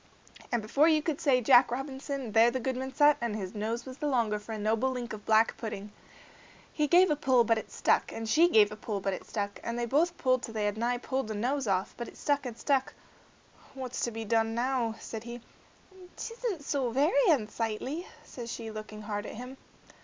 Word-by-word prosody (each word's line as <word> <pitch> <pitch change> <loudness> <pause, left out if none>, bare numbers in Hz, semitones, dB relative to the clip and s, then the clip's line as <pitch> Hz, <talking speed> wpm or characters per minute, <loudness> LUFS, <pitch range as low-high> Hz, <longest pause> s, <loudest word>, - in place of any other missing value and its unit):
And 240 -3 0
before 280 +8 +3
you 310 -2 +3
could 310 -3 -2
say 255 -3 +3
Jack 245 +1 +6
Robinson, 270 -1 -4
there 225 +2 +6
the 260 +2 -2
goodman 260 +1 -3
sat 295 +1 +5
and 235 -3 -1
his 190 -4 -5
nose 220 +3 -3
was 260 0 -9
the 300 - -1
longer 230 -6 +1
for 210 +2 -10
a - - -4
noble 220 +4 +1
link 245 -3 -4
of 210 -1 -9
black 220 +1 +4
pudding. 210 -2 -6 0.8
He 300 -1 +1
gave 355 +2 +5
a - - +3
pull 260 -4 +3
but 230 0 +2
it - - -11
stuck, - - +1
and 225 0 -5
she 325 +10 +5
gave 210 -9 +5
a - - -5
pull 215 -1 -4
but 195 0 -1
it - - -7
stuck, 205 -1 -3
and 235 0 -3
they 240 - -1
both 325 +8 +1
pulled 255 -1 +2
till 225 -2 -7
they 210 -1 0
had 205 0 0
nigh 240 +2 0
pulled 260 0 -3
the 215 - -4
nose 255 +4 -1
off, 190 -1 0
but 235 - -5
it - - -13
stuck 285 -2 0
and 235 -2 -7
stuck. 270 -1 0 0.8
"What's 255 -2 -5
to - - -2
be 225 -1 -6
done 225 +1 +1
now?" 240 -2 0
said 220 -1 -7
he. 240 0 -7 0.8
"'T 460 - -5
isn't 455 -10 -4
so 275 -3 -1
very 325 - +3
unsightly," 235 - -1 0.2
said 235 -2 -8
she, 225 -1 -5
looking 215 0 -8
hard 205 0 -4
at - - -8
him. 250 +3 -8
240 Hz, 220 wpm, -29 LUFS, 220-270 Hz, 0.8 s, Jack